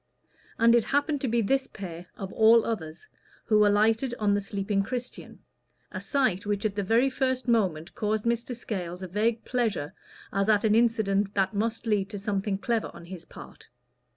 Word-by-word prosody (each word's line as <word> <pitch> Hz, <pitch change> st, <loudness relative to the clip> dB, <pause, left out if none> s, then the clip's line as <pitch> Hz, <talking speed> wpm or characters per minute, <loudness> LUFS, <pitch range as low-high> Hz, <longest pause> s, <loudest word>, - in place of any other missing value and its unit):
And 230 Hz, 0 st, +5 dB
it 235 Hz, -2 st, +4 dB
happened 290 Hz, 0 st, 0 dB
to 270 Hz, -, -1 dB
be 235 Hz, 0 st, +1 dB
this 265 Hz, +5 st, +1 dB
pair, 175 Hz, -3 st, -8 dB
of 195 Hz, -1 st, -6 dB
all 225 Hz, +1 st, +5 dB
others, 165 Hz, -8 st, -5 dB, 0.4 s
who 215 Hz, -1 st, +4 dB
alighted 220 Hz, +4 st, +2 dB
on 205 Hz, -2 st, +2 dB
the 205 Hz, -, +1 dB
sleeping 195 Hz, 0 st, -1 dB
Christian 245 Hz, +4 st, -6 dB, 0.5 s
a -, -, -5 dB
sight 260 Hz, -, 0 dB
which 205 Hz, 0 st, -2 dB
at 210 Hz, -, 0 dB
the 205 Hz, -, -2 dB
very 230 Hz, +7 st, +3 dB
first 260 Hz, -1 st, -1 dB
moment 190 Hz, -8 st, +1 dB
caused 215 Hz, 0 st, -1 dB
Mr. 235 Hz, +1 st, -1 dB
Scales 185 Hz, -6 st, -5 dB
a -, -, -4 dB
vague 220 Hz, +5 st, -1 dB
pleasure 220 Hz, -, -1 dB, 0.4 s
as 200 Hz, +2 st, +1 dB
at 210 Hz, -2 st, +4 dB
an 215 Hz, -1 st, +3 dB
incident 215 Hz, -3 st, +2 dB
that 195 Hz, 0 st, +1 dB
must 225 Hz, +3 st, -2 dB
lead 205 Hz, -3 st, 0 dB
to 210 Hz, -, -6 dB
something 200 Hz, 0 st, -2 dB
clever 230 Hz, +2 st, -1 dB
on 170 Hz, -, -11 dB
his 175 Hz, -1 st, -9 dB
part. -, -, -13 dB
215 Hz, 180 wpm, -27 LUFS, 195-235 Hz, 0.5 s, And